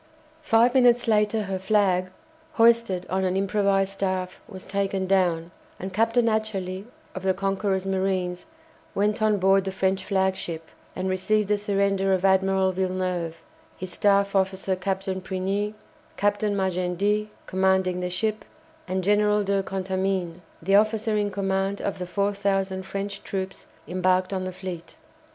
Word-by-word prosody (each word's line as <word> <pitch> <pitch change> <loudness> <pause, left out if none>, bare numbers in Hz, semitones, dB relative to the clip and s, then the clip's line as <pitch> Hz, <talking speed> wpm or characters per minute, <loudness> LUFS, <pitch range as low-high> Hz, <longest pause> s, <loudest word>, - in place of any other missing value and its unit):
Five 240 -4 +4
minutes 245 -2 +4
later 215 0 +2
her 195 -1 -3
flag, 190 -2 +2 0.4
hoisted 230 -6 +3
on 190 +1 -1
an 185 0 0
improvised 195 0 +1
staff, 185 -2 -3
was 190 -3 -9
taken 195 -1 -1
down, 175 -3 +1 0.3
and 190 +1 -6
Captain 230 +3 +2
Atcherley, 200 -4 -2 0.3
of 185 - -6
the 190 0 +1
"Conqueror's" 195 0 -1
marines, 190 - -1 0.5
went 210 +2 +1
on 215 -1 +3
board 195 0 +4
the 190 - -3
French 190 0 0
flagship, 190 -4 -1 0.3
and 185 +1 -2
received 200 +2 +1
the 210 - +3
surrender 195 -1 +1
of 185 +1 -1
Admiral 190 0 +3
Villeneuve, 185 -3 -2 0.3
his 185 -1 -7
staff 200 0 +2
officer 190 0 +1
Captain 190 0 -3
Prigny, 195 +3 -2 0.4
Captain 205 0 +1
Magendie, 190 +3 0 0.2
commanding 190 -1 +1
the 180 0 -2
ship, 215 +4 -1 0.4
and 185 0 -1
General 210 +1 +3
de 200 0 +1
Contamine, 190 -2 -2 0.2
the 195 +4 +1
officer 215 +1 +2
in 205 -1 +1
command 195 0 -1
of 200 - -3
the 180 - -4
4000 195 -1 0
French 200 +1 -4
troops 190 -1 -5 0.2
embarked 185 +2 +1
on 185 -1 -2
the 185 - -3
fleet. 180 -2 -8
195 Hz, 140 wpm, -25 LUFS, 185-205 Hz, 0.5 s, Five